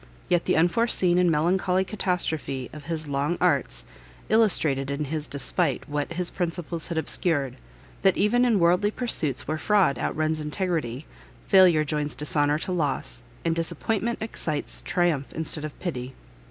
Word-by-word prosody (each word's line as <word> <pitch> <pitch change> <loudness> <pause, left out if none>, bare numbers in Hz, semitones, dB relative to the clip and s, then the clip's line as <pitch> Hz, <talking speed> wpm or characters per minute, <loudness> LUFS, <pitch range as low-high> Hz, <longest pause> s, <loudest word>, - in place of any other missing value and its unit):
Yet 175 -1 +2
the - - +2
unforeseen 180 0 +3
and 180 -1 +4
melancholy 180 +4 +2
catastrophe 160 - -2
of 150 -2 -10
his 160 -1 -3
long 145 +4 -1
arts, - - +1 0.4
illustrated 155 -11 +2
in 140 +2 -2
his 150 +1 -3
despite 140 0 0
what 145 +2 -3
his 175 +1 -1
principles 170 -2 -2
had 170 - -4
obscured, 150 -4 0 0.5
that 190 -1 +3
even 240 +4 +3
in 240 -4 +3
worldly 180 +4 +3
pursuits 210 - +1
where 155 +1 -2
fraud 185 - +2
out - - -2
runs 155 0 0
integrity, 150 - -2 0.4
failure 180 -5 +5
joins 150 0 -2
dishonour 145 0 +1
to 175 - -4
loss, 145 -7 -2 0.2
and 165 -1 +1
disappointment 200 +7 -1
excites 155 -8 -3
triumph 170 -6 0
instead 160 -1 -3
of 150 - -9
pity. 130 -7 -5
160 Hz, 150 wpm, -25 LUFS, 145-180 Hz, 0.5 s, failure